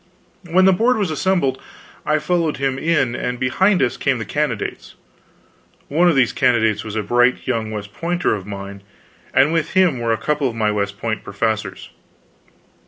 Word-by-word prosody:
When 185 +3 +4
the 190 - +6
Board 235 +6 +2
was 200 -6 -1
assembled, 155 -5 0 0.5
I 150 - +3
followed 160 0 0
him 135 -1 -1
in; 150 -7 +1
and 125 0 -3
behind 185 +10 +2
us - - -1
came 135 -3 0
the 110 - -5
candidates. 125 -3 -3 0.9
One 170 +5 +3
of 165 - +2
these 130 -3 +3
candidates 115 -5 +2
was 110 -1 -7
a 110 - -1
bright 120 +4 +2
young 115 -4 -1
West 105 -1 -7
Pointer 175 +5 -1
of 100 -2 -5
mine, 100 0 -7 0.5
and 140 +4 +3
with 165 -2 -1
him 180 -9 +3
were 115 -1 -1
a 115 - +1
couple 150 -1 0
of 115 - -8
my 110 -2 +1
West 100 -1 -2
Point 110 -1 -3
professors. 100 -2 -3
130 Hz, 175 wpm, -20 LUFS, 110-165 Hz, 0.9 s, the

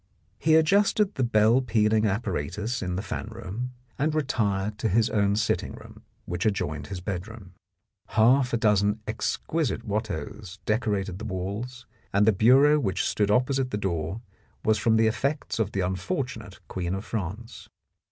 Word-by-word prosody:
He 160 0 +4
adjusted 200 +5 +3
the 130 - -1
bell 115 +1 +4
pealing 110 -2 +2
apparatus 105 - -2
in 90 -1 -2
the 95 - -3
fan 105 - -4
room, 115 +2 -6 0.3
and 155 +2 +1
retired 105 -8 0
to 110 - 0
his 110 +3 +2
own 100 -1 +2
sitting 110 0 0
room, - - -13 0.2
which 90 0 -3
adjoined 75 -8 -1
his 95 - -5
bedroom. 95 +1 -6 0.5
Half 125 +3 +4
a 120 - +2
dozen 105 -1 +2
exquisite 120 +5 -2
Watteaus 100 -3 -4
decorated 105 -4 -1
the - - -6
walls, 110 +6 -5 0.3
and 100 +1 +3
the 110 - +5
bureau 135 +9 +5
which 100 -9 -1
stood 105 -1 +1
opposite 130 +4 +2
the 105 - -2
door 85 0 -2 0.4
was 110 -1 +3
from 110 +2 +3
the 110 0 +4
effects 135 +5 -1
of 105 -2 0
the 95 - -1
unfortunate 105 - -3
Queen 90 0 -3
of 95 - -6
France. 110 +2 -5
110 Hz, 155 wpm, -26 LUFS, 95-120 Hz, 0.5 s, the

